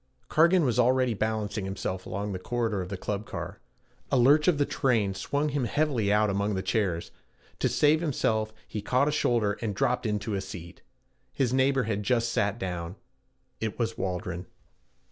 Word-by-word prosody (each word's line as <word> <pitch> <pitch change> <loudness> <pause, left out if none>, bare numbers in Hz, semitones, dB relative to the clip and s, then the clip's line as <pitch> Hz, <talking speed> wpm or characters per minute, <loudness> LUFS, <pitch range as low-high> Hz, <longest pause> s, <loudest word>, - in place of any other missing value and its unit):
Cargan 170 +1 +4
was 125 -1 +1
already 125 0 +3
balancing 110 -1 -2
himself 95 -1 -4
along 100 +2 -3
the 95 - -4
corridor 115 -2 -1
of 90 - -6
the 100 - -4
club 105 +2 -4
car. - - -6 0.5
A - - +4
lurch 145 +5 +5
of 175 -5 +4
the 145 - +2
train 115 -10 +1
swung 140 +10 -1
him 140 -3 -1
heavily 125 -6 +1
out 105 +1 +4
among 100 +1 0
the 95 - -2
chairs; 95 -4 -1 0.5
to - - +2
save 150 +2 +3
himself 110 -8 0 0.2
he 105 - -4
caught 125 +6 +2
a - - +2
shoulder 115 -8 +1
and 105 -4 -2
dropped 125 +3 +1
into 105 0 -2
a 100 - -1
seat. 90 -2 -9 0.5
His 130 -3 0
neighbor 135 0 +3
had 110 -2 -1
but 105 - -6
just 115 -2 +2
sat 105 0 0
down. 90 -3 -4 0.6
It 110 -1 -3
was 115 -2 -1
Waldron. 90 -1 -3
110 Hz, 185 wpm, -28 LUFS, 100-130 Hz, 0.6 s, lurch